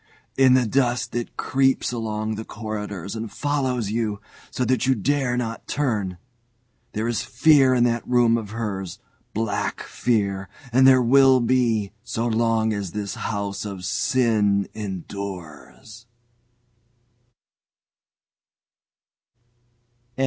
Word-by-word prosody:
In 130 -1 +5
the 130 -1 +3
dusk 125 +1 0
it 120 -1 -4
creeps 135 -1 +1
along 110 -2 -3
the 110 +1 -5
corridor 105 -5 -6
and 110 -1 -5
follows 130 -7 -1
you, 110 -2 -1 0.3
so 125 - -2
that 130 0 +1
you 130 - +4
dare 125 +2 0
not 115 -2 -4
turn. 105 -11 -1 0.8
There 110 +2 -2
is 120 -2 -1
Fear 140 -5 +4
in 120 - +3
that 120 -1 0
room 120 -2 +4
of 110 -3 -3
hers 100 -5 -4 0.4
black 110 -1 -2
Fear, 100 -5 -1 0.2
and 130 +1 +6
there 130 -1 +6
will 130 +1 +6
be 115 -4 +1
so 120 -1 -3
long 115 -1 +1
as 100 -4 -4
this 105 -2 -3
house 100 -2 -3
of 100 -3 -6
sin 105 -1 +1
endures." 100 +1 -8
115 Hz, 115 wpm, -23 LUFS, 105-125 Hz, 0.8 s, and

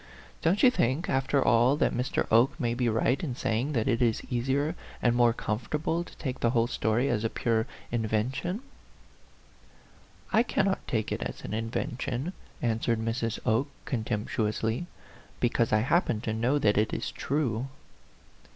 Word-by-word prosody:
" - - -24
Don't 180 +5 +2
you 255 - +8
think, 135 - 0
after 135 +1 +2
all, 120 +4 +5
that - - +2
Mr. 125 +3 0
Oke 120 +8 +4
may 120 -4 0
be 120 0 +1
right 115 - +1
in 130 -7 -2
say 110 -2 0
ing 140 +5 -2
that 115 -2 0
it 115 -2 +1
is 115 -3 +2
easier 135 +6 0 0.3
and 120 -1 +2
more 120 -1 +5
comfortable 150 +10 -2
to - - -15
take 130 -4 -4
the 120 - +2
whole 115 -1 +3
story 120 +1 0
as 120 -5 0
a 115 - +1
pure 115 -1 0 0.3
inven 110 +1 0
tion 175 +7 -2
r 225 - -7 1.1
" - - -26
I - - +7
cannot 195 -5 0
take 110 -3 -1
it - - -2
as - - -5
an - - -6
invention/' 120 - -2 0.3
an 115 -2 +1
swered 115 0 +1
Mrs. 115 0 -2
Oke, 115 +6 +2 0.2
contemptuously, 110 +3 -1 0.3
" - - -24
because 120 -1 +1
I 110 - +4
happen 130 -3 +2
to 110 -2 -2
know 120 +6 +1
that 105 -7 +3
it 110 - 0
is - - -3
true." 135 -4 -1
120 Hz, 180 wpm, -28 LUFS, 115-135 Hz, 1.1 s, you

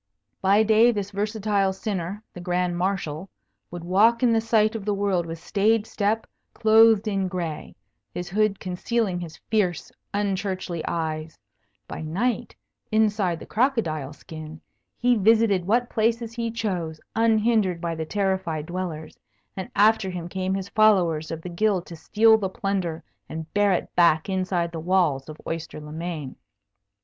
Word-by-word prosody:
By 200 +3 +4
day 220 +2 +5
this 205 -3 -4
versatile 205 -1 0
sinner, 195 0 -4
the 180 - -8
Grand 180 0 0
Marshal, 185 -2 -2 0.4
would 175 -1 -7
walk 215 +8 +3
in 240 -2 +4
the 225 - +3
sight 220 -1 +2
of 225 -3 -5
the 205 0 0
world 195 -4 0
with 165 0 -5
staid 210 +5 +1
step, 220 +1 -1 0.3
clothed 220 -1 +5
in 195 -2 0
gray, 175 -4 -5 0.4
his 175 0 -5
hood 210 +1 +1
concealing 185 +1 -1
his 170 -3 -8
fierce, 190 -6 0 0.2
unchurchly 190 -4 -2
eyes; 160 -1 -3 0.5
by - - -6
night, 195 +11 -2 0.4
inside 205 -5 +2
the - - -9
crocodile 210 - 0
skin, 155 +1 -10 0.4
he 245 0 +3
visited 210 -3 +3
what 240 +4 +2
places 230 +1 0
he 230 -1 -2
chose, 185 -9 -3 0.2
unhindered 220 -5 +2
by 170 -1 -2
the 160 -1 -3
terrified 190 -4 -1
dwellers, 175 -3 -5 0.4
and 190 - -5
after 210 -1 +4
him 175 -2 -5
came 190 +1 -2
his 195 0 -4
followers 180 -8 +3
of 165 -1 -6
the - - -6
Guild 185 +1 0
to 170 - -9
steal 220 +6 +4
the 195 -3 -2
plunder 190 -4 -2 0.3
and 160 0 -7
bear 205 -1 +3
it 180 - -2
back 165 -2 +4
inside 185 -2 -1
the 165 - -5
walls 160 -5 +1
of 155 - -8
Oyster 165 -2 -5
le 150 0 -10
Main. 160 -4 -5
190 Hz, 155 wpm, -24 LUFS, 170-215 Hz, 0.5 s, day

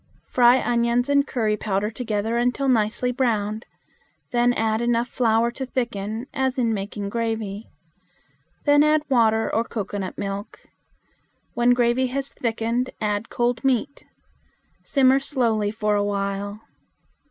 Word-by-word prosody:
Fry 245 +1 +5
onions 240 +2 +1
and 280 0 +3
curry 220 -4 0
powder 210 0 -1
together 220 -1 -2
until 245 +3 0
nicely 235 0 +1
browned. 220 -4 -1 0.6
Then 240 0 +3
add 220 -1 0
enough 240 0 +1
flour 235 -2 +1
to 265 - -6
thicken, 235 -3 -3
as 265 0 -1
in 235 -3 +1
making 200 0 -4
gravy. 225 -2 -3 1.0
Then 290 0 +5
add 305 0 +3
water 225 -3 +3
or 225 - +2
cocoanut 205 -4 -5
milk. 200 +1 -5 0.9
When 240 +1 +3
gravy 245 +1 +2
has 275 +2 -4
thickened, 230 +2 -1
add 210 +1 -2
cold 240 -1 -1
meat. 270 +2 0 0.8
Simmer 270 -1 +4
slowly 235 -7 0
for 210 0 -1
a 205 0 +2
while. 200 +1 -3
235 Hz, 130 wpm, -23 LUFS, 210-250 Hz, 1.0 s, Fry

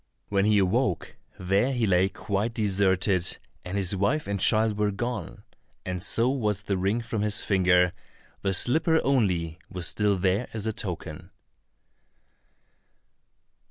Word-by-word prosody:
When 100 -1 +1
he 105 0 +3
awoke, 100 0 0 0.2
there 95 +8 +1
he 120 -3 0
lay 95 -1 +2
quite 105 +3 -3
deserted, 95 -3 +1 0.3
and 90 +2 -4
his 100 0 0
wife 130 +11 0
and 100 0 -3
child 110 +2 +2
were 105 0 +2
gone, 105 -1 -5 0.4
and 90 -1 -4
so 115 +5 +2
was 105 -7 -1
the 100 - -1
ring 100 +5 0
from 115 -2 -4
his 105 -1 +3
finger, 90 -2 +3 0.5
the 100 - 0
slipper 160 - +3
only 90 - 0
was 90 -2 -2
still 105 -2 +1
there 95 +5 0
as 110 -1 -3
a 110 - -1
token. 90 -5 -6
100 Hz, 140 wpm, -26 LUFS, 95-110 Hz, 0.5 s, he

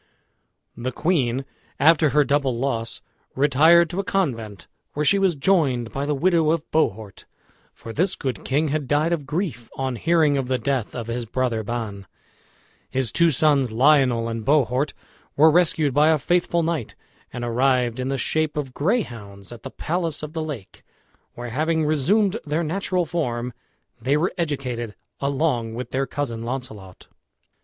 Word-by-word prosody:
The 120 +2 -4
queen, 135 -5 0 0.3
after 155 +2 +5
her 150 +1 +4
double 140 -3 0
loss, 115 -3 -2 0.3
retired 160 +5 +5
to 180 - -3
a - - 0
convent, 115 - -2 0.3
where 150 +1 -1
she 200 +7 +4
was 190 -4 +2
joined 135 -8 +1
by 140 +1 -3
the 150 - 0
widow 165 +1 +2
of 160 -1 +1
Bohort, 110 -10 -1 0.5
for 115 - -10
this 180 +7 +1
good 130 -7 -4
king 145 +3 0
had 150 -1 -2
died 150 +4 +2
of 150 -5 -3
grief 150 - -3
on 130 -2 -2
hearing 160 -1 +3
of 135 -2 -2
the 130 0 +1
death 130 -4 -2
of 120 -2 -4
his 115 0 -4
brother 120 -1 -1
Ban. 105 -3 -5 0.8
His 130 -4 -1
two 170 0 +4
sons, 140 -4 +2
Lionel 125 -2 +3
and 115 -1 -4
Bohort, 140 +1 +2 0.4
were 155 +2 +6
rescued 155 -4 +2
by 150 +3 +4
a 160 - +4
faithful 170 +2 +1
knight, 160 -8 -2 0.4
and 120 0 -5
arrived 125 0 +1
in 130 - -2
the 135 0 -1
shape 155 +4 -1
of 135 -4 -3
greyhounds 120 - -3
at 120 -2 -10
the - - -7
palace 165 -2 -3
of 150 0 -6
the 160 - -3
lake, 145 -11 -7 0.5
where, 120 0 -6
having 160 +4 0
resumed 190 +8 +2
their 155 +3 -1
natural 180 +2 -1
form, 125 -7 -2 0.5
they 135 +5 +2
were 170 +4 0
educated 130 - -3 0.2
along 140 -5 -1
with 125 +2 -6
their 135 +1 -1
cousin 120 -6 -3
Launcelot. 115 -6 -7
140 Hz, 165 wpm, -23 LUFS, 120-160 Hz, 0.8 s, were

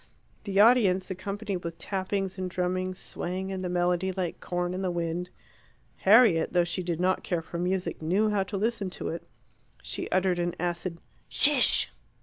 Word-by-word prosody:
The 200 -1 0
audience 205 -5 +5
accompanied 200 +2 -4
with 170 -1 -7
tappings 190 +1 -2
and 185 -1 -2
drummings, 185 +1 -2
swaying 190 +2 -4
in 190 -1 -4
the 180 - -3
melody 180 +1 +1
like 180 -2 -3
corn 175 0 -2
in 185 - -3
the 185 - 0
wind. 175 +1 -2 0.7
Harriet, 200 -5 +5
though 175 -1 +4
she 175 +2 -3
did 170 -2 -3
not 185 +1 +1
care 170 -3 -2
for 170 +1 -6
music, 180 0 -2
knew 195 +7 +2
how 205 -1 +1
to 200 +1 -4
listen 215 -1 -1
to - - -5
it. 165 - -4 0.6
She - - -5
uttered 185 -1 +1
an 175 0 -1
acid 175 0 -3 0.3
"Shish!" 290 -3 +5
185 Hz, 170 wpm, -28 LUFS, 175-195 Hz, 0.7 s, audience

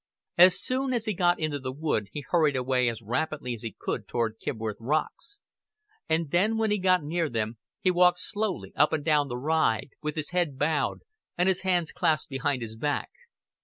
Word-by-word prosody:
As 180 +1 +7
soon 260 0 0
as 225 -2 -1
he 215 - 0
got 175 -1 +2
into 155 -3 -2
the 130 -1 -4
wood 135 -7 -1
he 145 -2 -6
hurried 155 -6 +2
as 125 -3 0
rapidly 125 +3 -2
as 115 - -7
he 115 -4 -6
could - - -4
toward 115 -2 -2
Kibworth 110 -4 -4
Rocks; 155 - -3 0.7
and 160 -2 0
then 210 +6 +2
when 220 -1 +1
he 210 - +1
got 185 -2 +3
near 165 +1 -1
them 115 -1 -3 0.2
he 185 - +3
walked 180 0 +4
slowly 205 +1 -2
up - - +3
and 150 -2 -1
down 150 -3 +3
the 120 -2 -4
ride, 145 -4 +1
with 150 0 -3
his 155 -1 -3
head 175 -6 0
bowed 150 +2 0 0.4
and 180 +1 +2
his 190 -1 +3
hands 180 -3 +1
clasped 155 0 0
behind 135 -1 -1
his 110 -1 -7
back. 145 +5 -2
155 Hz, 195 wpm, -27 LUFS, 125-180 Hz, 0.7 s, As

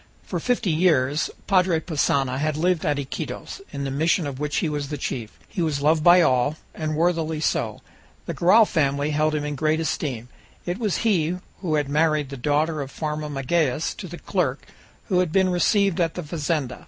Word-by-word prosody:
For - - -4
fifty 240 -6 0
years 155 -4 +2 0.2
Padre 185 -4 +3
Passanha 140 -5 0
had 155 0 -1
lived 175 +1 +1
at 145 - +1
Iquitos, 140 - -5
in 140 - -4
the 135 - -3
mission 160 +4 +1
of 140 -2 -5
which 150 0 -2
he - - +1
was 145 -2 -3
the 150 - -3
chief. 115 -7 -5
He 180 - -4
was 150 -4 -1
loved 155 +1 +3
by 175 +1 +7
all, 135 +2 +2 0.2
and 155 -1 -3
worthily 160 -1 0
so. 155 - -1 0.4
The - - -3
Garral 215 +6 +5
family 145 -4 0
held 155 +1 +1
him 150 -1 -2
in 150 - -2
great 155 +3 +1
esteem; 130 -7 -3 0.4
it 180 +4 -3
was 215 -5 0
he 180 -5 +2 0.2
who 165 -5 -1
had 145 -2 0
married 150 -1 +1
the 140 - -6
daughter 150 +4 0
of 135 - -5
Farmer 150 +1 -4
Magalhaës 145 +1 0
to 190 - -7
the 175 +1 -8
clerk 160 -10 -2 0.4
who 180 - +3
had 180 -3 +1
been 190 +1 +3
received 185 +1 +2
at 165 0 0
the 180 - -4
fazenda. 150 -4 -2
155 Hz, 195 wpm, -24 LUFS, 145-175 Hz, 0.4 s, by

